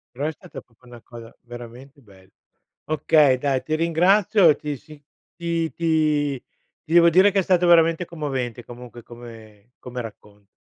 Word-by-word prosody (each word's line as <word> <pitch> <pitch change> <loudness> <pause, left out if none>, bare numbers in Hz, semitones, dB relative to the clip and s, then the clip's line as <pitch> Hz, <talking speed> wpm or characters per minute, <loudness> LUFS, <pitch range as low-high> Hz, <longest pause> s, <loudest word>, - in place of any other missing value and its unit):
Però 140 - -4
è 155 - -1
stata 150 - -12
proprio 125 +1 -26
una 120 -1 -14
cosa 115 -1 -13
veramente 120 +4 -12
bella. 95 -5 -21 0.6
Okay, 150 -3 +2
dai, 135 -1 -1
ti 155 - -2
ringrazio, 175 +2 +3
ti 150 0 -6
si 150 +3 -16 0.3
ti 170 -2 -3
ti 150 -5 -1 0.4
ti 160 - -7
devo 170 0 +6
dire 190 +4 +4
che 200 - +1
è - - +2
stato 180 -1 +1
veramente 165 0 +4
commovente 135 -8 -5
comunque 120 -1 -12
come 115 -2 -15
come 125 0 -7
racconto. 105 -3 -14
140 Hz, 160 wpm, -22 LUFS, 120-165 Hz, 0.6 s, devo